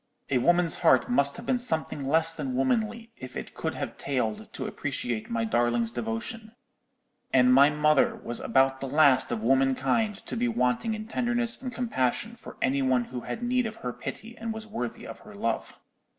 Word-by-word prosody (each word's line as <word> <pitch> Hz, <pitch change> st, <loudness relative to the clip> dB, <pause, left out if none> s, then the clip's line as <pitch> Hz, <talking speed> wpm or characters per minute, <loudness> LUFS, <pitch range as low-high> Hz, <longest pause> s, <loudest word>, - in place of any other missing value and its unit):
A 130 Hz, -, +3 dB
woman's 175 Hz, +4 st, +3 dB
heart 125 Hz, -2 st, +4 dB
must 140 Hz, -, +2 dB
have 230 Hz, -, -8 dB
been 250 Hz, 0 st, +1 dB
something 160 Hz, -, -2 dB
less 160 Hz, +4 st, +4 dB
than 140 Hz, -6 st, -4 dB
womanly 225 Hz, -, 0 dB
if 130 Hz, 0 st, -8 dB
it -, -, -7 dB
could -, -, -3 dB
have -, -, -5 dB
failed 120 Hz, -6 st, -2 dB
to -, -, -4 dB
appreciate 115 Hz, -3 st, -3 dB
my 115 Hz, -1 st, -1 dB
darling's 120 Hz, 0 st, +1 dB
devotion: 120 Hz, -, -4 dB, 0.8 s
and 125 Hz, -1 st, +5 dB
my 140 Hz, +2 st, +7 dB
mother 150 Hz, -1 st, +3 dB
was 120 Hz, -, -5 dB
about 135 Hz, 0 st, +2 dB
the 135 Hz, -, -4 dB
last 140 Hz, -1 st, +4 dB
of 115 Hz, -2 st, -2 dB
womankind 135 Hz, -, +1 dB
to -, -, -5 dB
be 240 Hz, +1 st, +1 dB
wanting 220 Hz, -, 0 dB
in 215 Hz, 0 st, -7 dB
tenderness 240 Hz, 0 st, -1 dB
and 255 Hz, -1 st, -4 dB
compassion 225 Hz, -, -1 dB
for 230 Hz, -, -12 dB
any 135 Hz, +1 st, +2 dB
one 130 Hz, -2 st, +2 dB
who 125 Hz, -, -3 dB
had 235 Hz, -, -5 dB
need 250 Hz, 0 st, +1 dB
of 220 Hz, -, -7 dB
her 125 Hz, -, -2 dB
pity 230 Hz, +2 st, -7 dB
and 230 Hz, -1 st, -4 dB
was 220 Hz, 0 st, -7 dB
worthy 125 Hz, -, -5 dB
of -, -, -9 dB
her -, -, -13 dB
love. -, -, -3 dB
140 Hz, 190 wpm, -27 LUFS, -, 0.8 s, my